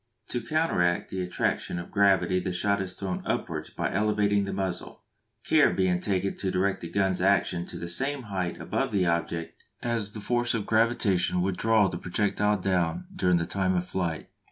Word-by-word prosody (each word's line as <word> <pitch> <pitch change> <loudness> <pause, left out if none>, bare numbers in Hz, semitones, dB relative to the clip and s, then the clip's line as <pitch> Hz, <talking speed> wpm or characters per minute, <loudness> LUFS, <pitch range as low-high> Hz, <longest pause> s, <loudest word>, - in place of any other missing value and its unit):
To 120 - -2
counteract 115 - +1
the 95 - -2
attraction 90 0 -1
of 85 - -7
gravity 100 -2 +3
the 90 +1 -3
shot 100 +3 +1
is 95 -1 -5
thrown 95 -2 -3
upwards - - -3
by - - -3
elevating 105 0 +2
the 100 - -4
muzzle, 95 -2 -4 0.4
care - - +5
being 90 -2 +1
taken 95 0 -1
to 95 - -2
direct 95 +1 0
the 85 - -6
gun's 95 0 +1
action 95 -2 +2
to - - -7
the 85 - -5
same 135 +10 0
height 95 -5 -3
above - - -1
the 95 -3 +2
object 85 -1 -2 0.2
as 115 -4 -1
the 110 - -6
force 120 +3 0
of 105 -3 -2
gravitation 110 -6 +2
would 95 0 0
draw 110 -1 +4
the 85 -2 -4
projectile 105 +3 +1
down 90 - 0
during 90 - +3
the 85 - -1
time 95 0 0
of 90 0 0
flight. 85 -4 -3
95 Hz, 185 wpm, -27 LUFS, 90-105 Hz, 0.4 s, care